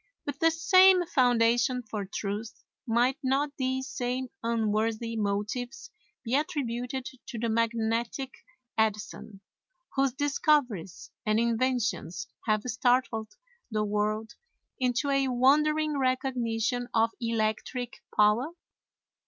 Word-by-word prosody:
With 290 Hz, -1 st, -4 dB
the 325 Hz, -, +5 dB
same 370 Hz, +2 st, +6 dB
foundation 245 Hz, -3 st, +3 dB
for 210 Hz, -2 st, -4 dB
truth, 210 Hz, +2 st, -5 dB, 0.2 s
might 240 Hz, +3 st, +2 dB
not 280 Hz, +2 st, 0 dB
these 260 Hz, 0 st, -1 dB
same 250 Hz, 0 st, -3 dB
unworthy 225 Hz, 0 st, 0 dB
motives 220 Hz, -, -3 dB, 0.3 s
be 235 Hz, -1 st, -4 dB
attributed 260 Hz, -3 st, -1 dB, 0.2 s
to 235 Hz, -, -6 dB
the 230 Hz, +1 st, -1 dB
magnetic 230 Hz, +3 st, -1 dB, 0.5 s
Edison, 210 Hz, -2 st, -2 dB, 0.5 s
whose 270 Hz, -2 st, +2 dB
discoveries 275 Hz, -, 0 dB
and 215 Hz, -1 st, +2 dB
inventions 235 Hz, -4 st, 0 dB, 0.2 s
have 215 Hz, -1 st, +2 dB
startled 245 Hz, -2 st, +1 dB, 0.3 s
the 215 Hz, -2 st, 0 dB
world 210 Hz, +2 st, -1 dB, 0.5 s
into 255 Hz, +2 st, +1 dB
a 275 Hz, -1 st, +2 dB
wondering 300 Hz, +4 st, +3 dB
recognition 245 Hz, -2 st, 0 dB
of 225 Hz, 0 st, +3 dB
electric 230 Hz, +2 st, -2 dB, 0.2 s
power? 210 Hz, +7 st, +4 dB
240 Hz, 105 wpm, -28 LUFS, 220-265 Hz, 0.5 s, same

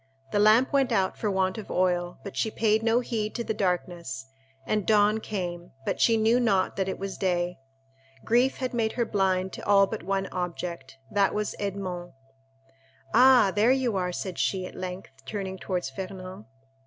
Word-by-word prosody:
The 205 Hz, -, +1 dB
lamp 220 Hz, +6 st, +5 dB
went 275 Hz, -3 st, +3 dB
out 190 Hz, -4 st, +1 dB
for 215 Hz, -, -2 dB
want 190 Hz, +1 st, 0 dB
of 210 Hz, -, -9 dB
oil, 180 Hz, -1 st, 0 dB
but 200 Hz, -, -8 dB
she 220 Hz, -, 0 dB
paid 220 Hz, 0 st, +2 dB
no 230 Hz, +2 st, +2 dB
heed 220 Hz, -3 st, -3 dB
to 235 Hz, -, -2 dB
the 220 Hz, -, -2 dB
darkness, 175 Hz, -9 st, -2 dB, 0.4 s
and 210 Hz, +4 st, 0 dB
dawn 210 Hz, 0 st, +4 dB
came, 180 Hz, -5 st, -5 dB
but -, -, -1 dB
she 230 Hz, -1 st, +5 dB
knew 225 Hz, +3 st, +3 dB
not 200 Hz, -6 st, +1 dB
that 190 Hz, -1 st, -1 dB
it -, -, -3 dB
was 195 Hz, 0 st, -6 dB
day. 175 Hz, -2 st, 0 dB, 0.7 s
Grief 245 Hz, +3 st, +3 dB
had 255 Hz, -1 st, -3 dB
made 225 Hz, -2 st, 0 dB
her 235 Hz, -, 0 dB
blind 190 Hz, -3 st, 0 dB
to -, -, -8 dB
all 200 Hz, -1 st, +6 dB
but 215 Hz, +2 st, -5 dB
one 195 Hz, +1 st, -1 dB
object—that 170 Hz, -1 st, -2 dB
was 210 Hz, 0 st, -1 dB
Edmond. 185 Hz, -3 st, -4 dB, 1.0 s
"Ah, 245 Hz, -4 st, +6 dB
you 240 Hz, +1 st, +3 dB
are 185 Hz, -1 st, 0 dB
there," -, -, -3 dB
said 180 Hz, 0 st, -5 dB
she, 185 Hz, -2 st, 0 dB
at -, -, -9 dB
length, 185 Hz, -2 st, -6 dB
turning 190 Hz, +3 st, -5 dB
towards 180 Hz, -8 st, -3 dB
Fernand. 185 Hz, +4 st, -7 dB
195 Hz, 180 wpm, -27 LUFS, 180-220 Hz, 1.0 s, all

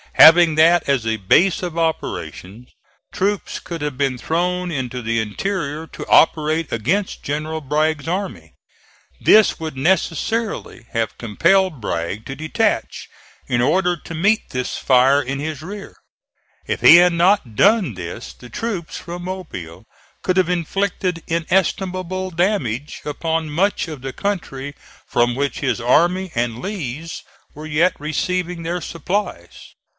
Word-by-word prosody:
Having 165 Hz, 0 st, +8 dB
that 165 Hz, +2 st, +4 dB
as 130 Hz, -5 st, +1 dB
a 110 Hz, 0 st, 0 dB
base 170 Hz, -, +3 dB
of 170 Hz, -2 st, -4 dB
operations, 125 Hz, -, -3 dB, 0.4 s
troops 200 Hz, +1 st, -1 dB
could 170 Hz, -2 st, -7 dB
have 145 Hz, -3 st, -3 dB
been 135 Hz, -2 st, 0 dB
thrown 180 Hz, +5 st, -1 dB
into 130 Hz, -4 st, -3 dB
the 115 Hz, 0 st, 0 dB
interior 150 Hz, -, -3 dB
to -, -, -8 dB
operate 155 Hz, 0 st, +3 dB
against 160 Hz, -, -1 dB
General 155 Hz, +2 st, -3 dB
Bragg's 155 Hz, +2 st, 0 dB
army. 190 Hz, +3 st, -4 dB, 0.7 s
This 215 Hz, 0 st, +5 dB
would 160 Hz, -4 st, -5 dB
necessarily 175 Hz, -, -1 dB
have 115 Hz, -2 st, -2 dB
compelled 170 Hz, -, +2 dB
Bragg 90 Hz, +3 st, -3 dB
to 135 Hz, -, -6 dB
detach 155 Hz, +2 st, -1 dB, 0.4 s
in 120 Hz, -1 st, +1 dB
order 180 Hz, +7 st, +2 dB
to 170 Hz, -, -10 dB
meet 205 Hz, +7 st, +1 dB
this 125 Hz, -1 st, -3 dB
fire 135 Hz, +2 st, +4 dB
in 135 Hz, 0 st, -4 dB
his 155 Hz, -1 st, -4 dB
rear. 200 Hz, +5 st, -8 dB, 0.7 s
If -, -, -2 dB
he -, -, +9 dB
had 175 Hz, 0 st, +5 dB
not 170 Hz, -, +2 dB
done 200 Hz, -, +4 dB
this 85 Hz, -9 st, -7 dB
the 90 Hz, -, -14 dB
troops 200 Hz, -, -4 dB
from 175 Hz, +1 st, -7 dB
Mobile 110 Hz, -, -7 dB, 0.4 s
could 185 Hz, 0 st, 0 dB
have 185 Hz, -2 st, +3 dB
inflicted 180 Hz, 0 st, -1 dB
inestimable 185 Hz, +2 st, -1 dB
damage 160 Hz, -, -1 dB
upon 160 Hz, +1 st, -2 dB
much 190 Hz, +4 st, +1 dB
of 155 Hz, -5 st, -7 dB
the 135 Hz, 0 st, -5 dB
country 145 Hz, -9 st, -4 dB, 0.3 s
from 120 Hz, 0 st, +1 dB
which 140 Hz, +1 st, -2 dB
his 130 Hz, -4 st, -1 dB
army 175 Hz, +9 st, +2 dB
and 120 Hz, 0 st, -1 dB
Lee's 165 Hz, -, -5 dB, 0.3 s
were 155 Hz, +1 st, -8 dB
yet 160 Hz, +4 st, +2 dB
receiving 170 Hz, +4 st, -2 dB
their 175 Hz, +2 st, -2 dB
supplies. 180 Hz, +7 st, -4 dB
160 Hz, 140 wpm, -20 LUFS, 130-180 Hz, 0.7 s, he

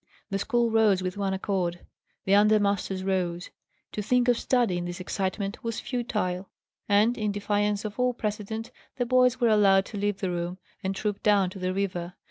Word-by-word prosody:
The 195 Hz, -, 0 dB
school 240 Hz, +1 st, +1 dB
rose 215 Hz, -4 st, +3 dB
with 185 Hz, 0 st, -3 dB
one 200 Hz, -1 st, -1 dB
accord. 190 Hz, -3 st, -2 dB, 0.4 s
The 195 Hz, -, +2 dB
under 210 Hz, +1 st, +5 dB
masters 200 Hz, -2 st, -1 dB
rose. 180 Hz, -2 st, -1 dB, 0.4 s
To 210 Hz, -, -3 dB
think 245 Hz, +4 st, +2 dB
of 245 Hz, -, +5 dB
study, 235 Hz, -9 st, +1 dB
in 175 Hz, -, -4 dB
this 175 Hz, 0 st, -5 dB
excitement, 195 Hz, +2 st, -3 dB
was 230 Hz, -1 st, -3 dB
futile; 210 Hz, -7 st, -2 dB, 0.4 s
and, 210 Hz, +4 st, +4 dB
in 210 Hz, -1 st, 0 dB
defiance 205 Hz, 0 st, 0 dB
of 210 Hz, +3 st, -6 dB
all 250 Hz, -1 st, +2 dB
precedent, 220 Hz, +1 st, -4 dB, 0.3 s
the 245 Hz, -, 0 dB
boys 250 Hz, 0 st, +3 dB
were 240 Hz, -2 st, +3 dB
allowed 195 Hz, -3 st, +5 dB
to 210 Hz, -, -7 dB
leave 205 Hz, -1 st, 0 dB
the 190 Hz, -2 st, -1 dB
room, 175 Hz, +1 st, -3 dB, 0.3 s
and 190 Hz, 0 st, -1 dB
troop 205 Hz, 0 st, -2 dB
down 200 Hz, -3 st, +3 dB
to 190 Hz, -, -9 dB
the 185 Hz, 0 st, -1 dB
river. 180 Hz, -2 st, -3 dB
205 Hz, 190 wpm, -27 LUFS, 185-220 Hz, 0.4 s, under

